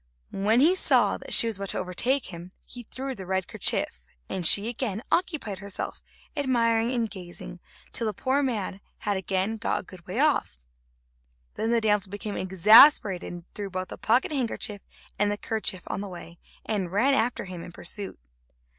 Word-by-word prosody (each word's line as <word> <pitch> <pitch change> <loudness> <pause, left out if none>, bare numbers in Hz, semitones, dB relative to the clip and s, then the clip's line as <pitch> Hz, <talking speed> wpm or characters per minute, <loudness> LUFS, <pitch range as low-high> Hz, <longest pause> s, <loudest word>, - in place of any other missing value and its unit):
When 215 +5 +3
he 330 +6 +6
saw 375 - +3
that - - -11
she - - +7
was 225 -3 0
about 195 -1 -5
to - - -1
overtake 190 +6 0
him, 170 +1 -8 0.2
he 245 -2 -10
threw 265 +1 -4
the 190 -6 -9
red 190 -1 -1
kerchief, 60 - -1 0.2
and 180 -3 -1
she 205 +5 +5
again 230 -3 -3
occupied 300 - -1
herself, 200 -1 -4 0.3
admiring 235 -4 +2
and 235 -3 0
gazing, 180 -3 -9 0.3
till 230 - -2
the 215 - -1
poor 265 +7 +1
man 210 -7 -2 0.2
had 205 - 0
again 190 +3 -1
got - - -1
a - - -17
good 180 -2 -14
way 190 +5 -5
off. 290 - +2 1.0
Then 220 - -2
the 235 0 +3
damsel 210 -3 +1
became 205 +1 -5
exasperated, 195 - +6
and 175 -1 -9
threw 205 -1 -5
both 185 0 -4
the - - -7
pocket 240 +7 +2
handkerchief 225 -6 -2 0.4
and 205 0 +3
the 205 - -2
kerchief 210 -5 -2
on - - -4
the 205 - -6
way, 175 -1 -10 0.3
and 195 -5 -2
ran 240 +8 +3
after 240 -3 0
him 180 -2 -7
in 175 - -9
pursuit. 190 +3 -5
205 Hz, 180 wpm, -26 LUFS, 185-235 Hz, 1.0 s, she